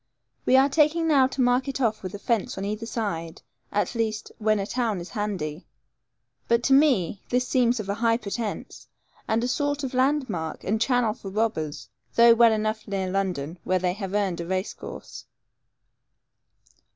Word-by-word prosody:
We 260 Hz, -, +6 dB
are 270 Hz, +1 st, +6 dB
taking 310 Hz, +3 st, +2 dB
now 275 Hz, -4 st, +5 dB
to 265 Hz, 0 st, -3 dB
mark 245 Hz, +1 st, +2 dB
it 275 Hz, -, -3 dB
off 225 Hz, -4 st, 0 dB
with 185 Hz, 0 st, -6 dB
a -, -, -4 dB
fence 225 Hz, 0 st, -1 dB
on 195 Hz, -, -3 dB
either 215 Hz, +2 st, -4 dB
side, 170 Hz, -9 st, -4 dB, 0.3 s
at 205 Hz, -, 0 dB
least, 220 Hz, -2 st, -2 dB
when 215 Hz, 0 st, +2 dB
a 195 Hz, -, -2 dB
town 225 Hz, -3 st, -1 dB
is 175 Hz, -, -9 dB
handy; 185 Hz, -8 st, -4 dB, 0.8 s
but 235 Hz, 0 st, +2 dB
to 270 Hz, -, +3 dB
me 250 Hz, -, +3 dB
this 250 Hz, 0 st, +1 dB
seems 245 Hz, -2 st, +2 dB
of 210 Hz, -, -5 dB
a 200 Hz, -, 0 dB
high 230 Hz, +1 st, +2 dB
pretence, 215 Hz, -1 st, -5 dB, 0.4 s
and 225 Hz, +1 st, +1 dB
a -, -, +1 dB
sort 290 Hz, +2 st, -1 dB
of 265 Hz, -, -3 dB
landmark, 255 Hz, -, 0 dB
and 215 Hz, +3 st, -1 dB
channel 245 Hz, -3 st, +2 dB
for 200 Hz, -3 st, -9 dB
robbers, 190 Hz, -8 st, -2 dB, 0.3 s
though 235 Hz, 0 st, +8 dB
well 230 Hz, 0 st, +6 dB
enough 215 Hz, +1 st, -1 dB
near 190 Hz, -2 st, -2 dB
London, 180 Hz, -4 st, -2 dB
where 185 Hz, -, +1 dB
they 180 Hz, 0 st, 0 dB
have 195 Hz, 0 st, -5 dB
earned 195 Hz, -4 st, 0 dB
a 170 Hz, -, -6 dB
race 190 Hz, +2 st, -2 dB
course. -, -, -9 dB
220 Hz, 180 wpm, -25 LUFS, 195-245 Hz, 0.8 s, though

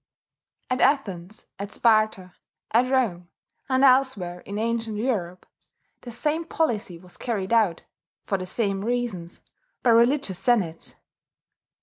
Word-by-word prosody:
At 255 Hz, -, 0 dB
Athens, 210 Hz, -, 0 dB
at 200 Hz, +1 st, -5 dB
Sparta, 215 Hz, -6 st, +2 dB, 0.4 s
at 245 Hz, +3 st, +3 dB
Rome, 185 Hz, -10 st, 0 dB, 0.4 s
and 260 Hz, 0 st, +2 dB
elsewhere 255 Hz, -10 st, +3 dB
in 200 Hz, +3 st, -7 dB
ancient 225 Hz, -1 st, -2 dB
Europe, 195 Hz, -7 st, -2 dB, 0.6 s
the 245 Hz, -, -9 dB
same 300 Hz, +7 st, -1 dB
policy 230 Hz, -, -1 dB
was 180 Hz, +1 st, -14 dB
carried 215 Hz, -4 st, -2 dB
out, 210 Hz, -7 st, +2 dB, 0.4 s
for 195 Hz, -, -1 dB
the 185 Hz, -, -5 dB
same 195 Hz, -1 st, -1 dB
reasons, 230 Hz, -8 st, -3 dB, 0.4 s
by 240 Hz, -, +5 dB
religious 235 Hz, -4 st, +3 dB
senates. 195 Hz, -7 st, 0 dB
220 Hz, 120 wpm, -25 LUFS, 185-245 Hz, 0.6 s, by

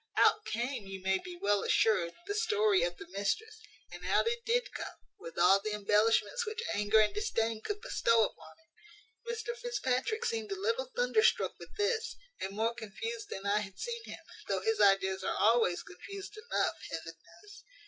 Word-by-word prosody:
Out 430 Hz, -, +4 dB
came, 235 Hz, -1 st, -3 dB
you 195 Hz, 0 st, -6 dB
may 190 Hz, 0 st, +2 dB
be 355 Hz, -1 st, -9 dB
well 205 Hz, -, +2 dB
assured, 190 Hz, -6 st, +2 dB
the 405 Hz, -, -2 dB
story 430 Hz, -2 st, +3 dB
of 175 Hz, 0 st, -1 dB
the -, -, -10 dB
mistress; 205 Hz, -, -2 dB, 0.3 s
and -, -, -9 dB
out -, -, +3 dB
it 470 Hz, +1 st, -1 dB
did -, -, +1 dB
come, -, -, -6 dB, 0.2 s
with 165 Hz, -, -10 dB
all 180 Hz, +3 st, +6 dB
the 215 Hz, +1 st, -3 dB
embellishments 210 Hz, -, +2 dB
which 445 Hz, 0 st, -4 dB
anger 210 Hz, +1 st, +3 dB
and 215 Hz, -1 st, +4 dB
disdain 230 Hz, -, -1 dB
could 415 Hz, -, -4 dB
bestow 230 Hz, -, +3 dB
upon -, -, -10 dB
it. 420 Hz, +7 st, -13 dB
"Mr 465 Hz, +1 st, -4 dB
Fitzpatrick 440 Hz, -, -1 dB
seemed 450 Hz, -3 st, -2 dB
a 390 Hz, -, -3 dB
little 460 Hz, +4 st, -1 dB
thunderstruck -, -, +3 dB
with -, -, -12 dB
this, 450 Hz, +2 st, 0 dB, 0.2 s
and 195 Hz, +1 st, -4 dB
more 225 Hz, +2 st, +1 dB
confused 420 Hz, -, -6 dB
than 195 Hz, -, -6 dB
I 205 Hz, +1 st, +3 dB
had 195 Hz, -2 st, -7 dB
seen 470 Hz, -1 st, -4 dB
him, -, -, -7 dB, 0.3 s
though -, -, 0 dB
his 445 Hz, -1 st, +1 dB
ideas 190 Hz, -1 st, +4 dB
are -, -, -1 dB
always 225 Hz, -5 st, +3 dB
confused 395 Hz, -, -9 dB
enough, 430 Hz, +2 st, -1 dB
heaven -, -, -5 dB
knows. 410 Hz, 0 st, -16 dB
360 Hz, 180 wpm, -32 LUFS, -, 0.3 s, all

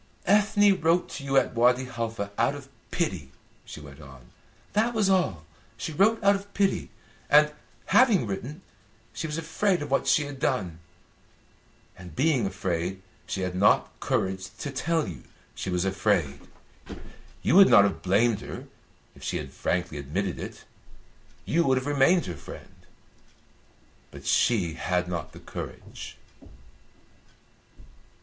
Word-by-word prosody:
"Ethne 205 Hz, -1 st, +4 dB
wrote 165 Hz, +2 st, +2 dB
to 140 Hz, -, -7 dB
you 135 Hz, 0 st, +1 dB
at -, -, +2 dB
Wadi 125 Hz, +2 st, +3 dB
Halfa 115 Hz, -4 st, -4 dB
out 120 Hz, +6 st, +1 dB
of 140 Hz, -1 st, -10 dB, 0.2 s
pity," 90 Hz, -, -2 dB, 0.3 s
she -, -, -10 dB
went 75 Hz, 0 st, -12 dB
on, 65 Hz, -4 st, -14 dB, 0.4 s
"that 225 Hz, +3 st, +1 dB
was 205 Hz, -3 st, +2 dB
all. 140 Hz, -, +1 dB, 0.3 s
She 135 Hz, +8 st, -5 dB
wrote 215 Hz, +7 st, +3 dB
out 200 Hz, 0 st, +6 dB
of 200 Hz, +1 st, -8 dB
pity; 195 Hz, -1 st, +1 dB, 0.4 s
and, 150 Hz, 0 st, +5 dB, 0.3 s
having 225 Hz, -, +4 dB
written, 125 Hz, -, -6 dB, 0.5 s
she 160 Hz, -, -4 dB
was 150 Hz, 0 st, -4 dB
afraid 165 Hz, +1 st, 0 dB
of 145 Hz, -, -8 dB
what 135 Hz, -, +1 dB
she 150 Hz, -, +4 dB
had 140 Hz, -2 st, -8 dB
done; 95 Hz, -, -1 dB, 1.2 s
and 90 Hz, -1 st, -12 dB
being 130 Hz, -5 st, +2 dB
afraid, 95 Hz, -1 st, -3 dB, 0.2 s
she 95 Hz, -, -3 dB
had 90 Hz, -1 st, -2 dB
not 95 Hz, +3 st, +3 dB
courage 95 Hz, 0 st, -1 dB
to 140 Hz, +5 st, -5 dB
tell 160 Hz, +5 st, 0 dB
you 80 Hz, -8 st, -7 dB, 0.3 s
she -, -, -5 dB
was 90 Hz, 0 st, 0 dB
afraid. 95 Hz, -7 st, 0 dB, 1.0 s
You -, -, +2 dB
would 195 Hz, -1 st, +9 dB
not 100 Hz, -, +8 dB
have 100 Hz, -1 st, -1 dB
blamed 105 Hz, +4 st, +2 dB
her, -, -, -8 dB, 0.5 s
if -, -, -16 dB
she -, -, -2 dB
had -, -, -6 dB
frankly 90 Hz, -4 st, -2 dB
admitted 90 Hz, +7 st, -3 dB
it; -, -, -8 dB, 0.8 s
you 170 Hz, +2 st, +2 dB
would 130 Hz, -4 st, +2 dB
have 130 Hz, -, -2 dB
remained 145 Hz, +5 st, +3 dB
her 90 Hz, -, -4 dB
friend. 70 Hz, -, -12 dB, 1.2 s
But -, -, -12 dB
she 95 Hz, -9 st, +2 dB
had 90 Hz, +1 st, -1 dB
not 85 Hz, -3 st, -4 dB
the -, -, -11 dB
courage." -, -, -8 dB
120 Hz, 145 wpm, -26 LUFS, -, 1.2 s, would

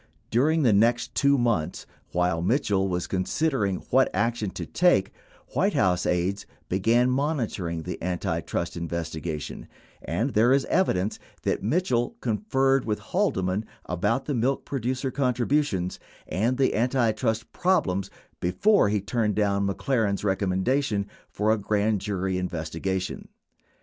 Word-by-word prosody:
During 150 Hz, +7 st, +3 dB
the 115 Hz, -5 st, +5 dB
next 115 Hz, +4 st, +2 dB
2 140 Hz, 0 st, +3 dB
months, 115 Hz, -11 st, 0 dB, 0.3 s
while 90 Hz, -1 st, +1 dB
Mitchell 100 Hz, -, +1 dB
was 90 Hz, -2 st, -1 dB
considering 100 Hz, +1 st, 0 dB, 0.2 s
what 130 Hz, +1 st, +4 dB
action, 115 Hz, -3 st, 0 dB
to 90 Hz, -, -6 dB
take, 170 Hz, -, +2 dB, 0.4 s
White -, -, +1 dB
House 90 Hz, -1 st, +2 dB
aides 95 Hz, +3 st, 0 dB, 0.2 s
began 115 Hz, +7 st, +3 dB
monitoring 115 Hz, -, -1 dB
the -, -, -6 dB
antitrust 85 Hz, -1 st, -2 dB
investigation 85 Hz, -2 st, -4 dB, 0.3 s
and 125 Hz, +6 st, -1 dB
there 120 Hz, +4 st, +4 dB
is 135 Hz, 0 st, +2 dB
evidence 105 Hz, -, +1 dB, 0.2 s
that -, -, 0 dB
Mitchell 120 Hz, -, 0 dB
conferred 135 Hz, +4 st, +1 dB
with 105 Hz, -2 st, -1 dB
Haldeman 95 Hz, +3 st, 0 dB, 0.2 s
about 105 Hz, +9 st, 0 dB
the 145 Hz, -, -2 dB
milk 130 Hz, +2 st, 0 dB
producer 130 Hz, 0 st, -2 dB
contributions 125 Hz, -6 st, 0 dB, 0.3 s
and 115 Hz, +7 st, 0 dB
the 135 Hz, -1 st, +2 dB
antitrust 115 Hz, -2 st, 0 dB
problem 165 Hz, -, +1 dB, 0.4 s
before 105 Hz, -, +3 dB
he 105 Hz, -1 st, 0 dB
turned 105 Hz, 0 st, 0 dB
down 100 Hz, -1 st, +1 dB
McLaren's 105 Hz, -1 st, 0 dB
recommendation 100 Hz, +4 st, 0 dB, 0.2 s
for 105 Hz, +2 st, +1 dB
a 110 Hz, -, +2 dB
grand 105 Hz, 0 st, +1 dB
jury 95 Hz, -2 st, -1 dB
in 90 Hz, -, -1 dB
vestigation. 90 Hz, +3 st, -3 dB
105 Hz, 130 wpm, -26 LUFS, 95-130 Hz, 0.4 s, the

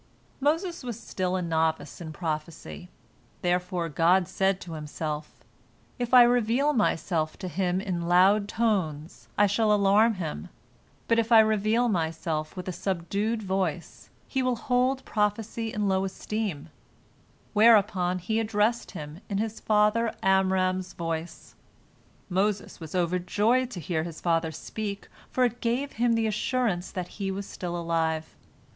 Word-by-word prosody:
" -, -, -34 dB
Moses 340 Hz, +2 st, -2 dB
was 240 Hz, -3 st, -5 dB
still 185 Hz, -4 st, -2 dB
a 185 Hz, -, -1 dB
novice 160 Hz, -2 st, -1 dB
in 160 Hz, -2 st, -6 dB
prophecy, 155 Hz, -, -5 dB, 0.5 s
therefore 180 Hz, -1 st, 0 dB
God 170 Hz, +4 st, +3 dB
said 195 Hz, +2 st, +1 dB
to 170 Hz, -, -8 dB
Himself, 150 Hz, 0 st, -5 dB, 0.6 s
"If 245 Hz, -1 st, -2 dB
I 250 Hz, -1 st, +9 dB
reveal 245 Hz, +4 st, +2 dB
Myself 165 Hz, -, 0 dB
to 185 Hz, -, -6 dB
him 180 Hz, +1 st, 0 dB
in 180 Hz, -4 st, -3 dB
loud 195 Hz, +4 st, +4 dB
tones, 185 Hz, -9 st, -1 dB
I 205 Hz, -, +6 dB
shall 210 Hz, +2 st, +2 dB
alarm 210 Hz, +2 st, +4 dB
him, 155 Hz, -, -5 dB, 0.6 s
but 230 Hz, 0 st, +3 dB
if 230 Hz, +1 st, -1 dB
I 225 Hz, -, +9 dB
reveal 220 Hz, +2 st, +3 dB
Myself 160 Hz, -4 st, -2 dB
with 180 Hz, -, -6 dB
a -, -, -1 dB
subdued 200 Hz, +5 st, -2 dB
voice, 185 Hz, -4 st, -3 dB, 0.2 s
he 265 Hz, -, -1 dB
will 255 Hz, -1 st, +1 dB
hold 255 Hz, +3 st, 0 dB
prophecy 220 Hz, +2 st, -1 dB
in 210 Hz, -2 st, -1 dB
low 190 Hz, 0 st, +2 dB
esteem," 195 Hz, -4 st, -4 dB, 0.8 s
whereupon 205 Hz, -5 st, +4 dB
he 220 Hz, +5 st, -1 dB
addressed 220 Hz, +1 st, 0 dB
him 150 Hz, +4 st, -8 dB
in 200 Hz, -, -1 dB
his 220 Hz, +1 st, -2 dB
father 215 Hz, +2 st, +2 dB
Amram's 185 Hz, -1 st, +2 dB
voice. 165 Hz, 0 st, -5 dB, 0.7 s
Moses 200 Hz, +2 st, -1 dB
was 160 Hz, +1 st, -8 dB
overjoyed 205 Hz, +8 st, +1 dB
to 190 Hz, -, -7 dB
hear 160 Hz, -1 st, -2 dB
his 165 Hz, -1 st, -6 dB
father 165 Hz, -1 st, +1 dB
speak, 205 Hz, +4 st, -6 dB, 0.2 s
for 255 Hz, -, +1 dB
it 240 Hz, -1 st, 0 dB
gave 250 Hz, +4 st, -1 dB
him 235 Hz, +1 st, +1 dB
the 225 Hz, -1 st, +1 dB
assurance 215 Hz, -3 st, 0 dB
that. 180 Hz, -2 st, -4 dB
he 195 Hz, -1 st, -1 dB
was 195 Hz, +1 st, -4 dB
still 175 Hz, -1 st, -5 dB
alive. 165 Hz, -2 st, -1 dB
195 Hz, 145 wpm, -27 LUFS, 170-220 Hz, 0.8 s, I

